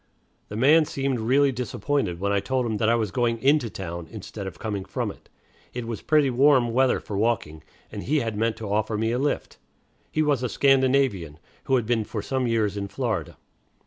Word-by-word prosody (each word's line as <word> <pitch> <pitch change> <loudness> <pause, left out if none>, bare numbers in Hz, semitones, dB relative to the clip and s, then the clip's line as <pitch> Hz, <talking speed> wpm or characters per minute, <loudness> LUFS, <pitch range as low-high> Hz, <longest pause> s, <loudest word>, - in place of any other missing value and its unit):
The 105 - -6
man 150 +8 +5
seemed 135 -3 -2
really 135 +5 +3
disappointed 125 -5 -2
when 100 +1 0
I 100 - +2
told 130 +4 -1
him 110 -2 -1
that 110 +1 +1
I 115 - +4
was 110 -4 -1
going 120 0 +1
into 135 0 +2
town, 85 -3 -6
instead 105 -2 -7
of 95 - -8
coming 105 -3 -4
from - - -3
it. - - -18 0.5
It 125 -1 -4
was 115 -3 -5
pretty 150 -4 +3
warm 130 -2 +4
weather 130 +1 +3
for 105 - -7
walking, 100 -8 -1 0.3
and - - -6
he 150 +3 +1
had 115 -3 -3
meant 115 +1 0
to 105 -3 -4
offer 110 +1 0
me 110 +1 0
a 120 - 0
lift. 145 +1 -2 0.5
He 155 - +1
was 145 -4 +1
a 125 - -1
Scandinavian, 130 - +2 0.3
who 135 - +2
had 120 -3 +1
been 115 -1 +1
for 105 -1 -5
some 130 +2 -1
years 110 -3 +1
in 100 0 -3
Florida. 110 - -3
115 Hz, 210 wpm, -25 LUFS, 105-135 Hz, 0.5 s, man